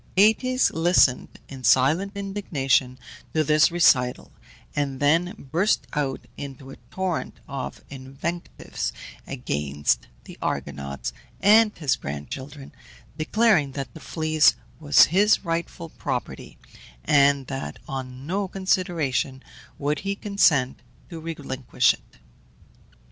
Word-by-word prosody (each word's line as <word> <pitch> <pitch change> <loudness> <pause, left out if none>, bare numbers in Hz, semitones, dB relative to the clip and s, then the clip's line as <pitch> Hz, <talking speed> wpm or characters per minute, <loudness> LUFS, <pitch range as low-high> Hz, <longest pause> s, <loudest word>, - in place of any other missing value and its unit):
Aëtes 255 +6 +4
listened, 165 -6 +3 0.2
in 135 -2 -10
silent 155 - +3
indignation, 145 -11 0 0.4
to 155 - +3
this 150 +1 +4
recital, 130 -8 +2 0.4
and 140 -2 -2
then 165 +5 +2 0.2
burst 185 +7 +2
out 140 -3 -1 0.2
into 135 -1 -8
a - - -11
torrent 185 -3 -3
of 135 -1 -6
invectives 135 +6 -5 0.4
against 75 - -1 0.2
the - - -13
Argonauts 70 -3 -4 0.3
and 215 +2 +5
his 145 -6 +1
grand 70 +1 -7
children, 140 +1 -8 0.4
declaring 165 - +2
that 135 -1 -5
the 160 - -10
Fleece 155 -1 +2 0.2
was 145 -3 +6
his 205 +1 +4
rightful 165 0 -3
property, - - -5 0.5
and 140 -1 +4
that 135 +1 -5
on 130 -1 -6
no 195 +5 -1
consideration 175 -9 -1 0.3
would 150 +1 -1
he 200 0 -3
consent 170 -11 +2 0.3
to 165 - -6
relinquish 145 -5 0
it. - - -18
150 Hz, 110 wpm, -24 LUFS, 135-180 Hz, 0.5 s, was